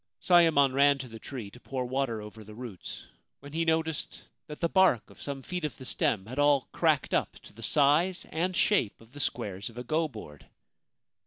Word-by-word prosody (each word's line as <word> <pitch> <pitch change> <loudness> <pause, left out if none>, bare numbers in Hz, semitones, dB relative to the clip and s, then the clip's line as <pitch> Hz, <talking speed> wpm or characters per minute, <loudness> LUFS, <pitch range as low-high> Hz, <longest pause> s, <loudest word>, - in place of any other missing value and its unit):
Sayemon 165 -7 +5
ran 140 +1 +5
to 130 -1 -7
the 115 -1 -10
tree, 115 -5 -7
to 125 - -14
pour 130 0 -4
water 125 -4 -2
over 105 +1 -10
the 105 0 -12
roots, 115 -6 -8 0.4
when 140 +1 -12
he 165 +1 +1
noticed 160 -1 -1 0.2
that 150 - -8
the 170 - +2
bark 185 - +3
of - - -16
some 140 -2 -5
feet 180 +3 -4
of 150 - -3
the 130 - -10
stem 100 -5 0
had 130 +6 -6
all 145 -1 +5
cracked - - +1
up - - 0
to - - -14
the 115 - -13
size 150 - +3
and 175 +3 -1
shape 160 - +2
of 115 +1 -19
the 145 - -10
squares 105 -7 -3
of 115 - -15
a 125 - -4
go 155 +5 0
board 105 - -11
135 Hz, 210 wpm, -29 LUFS, 115-160 Hz, 0.4 s, Sayemon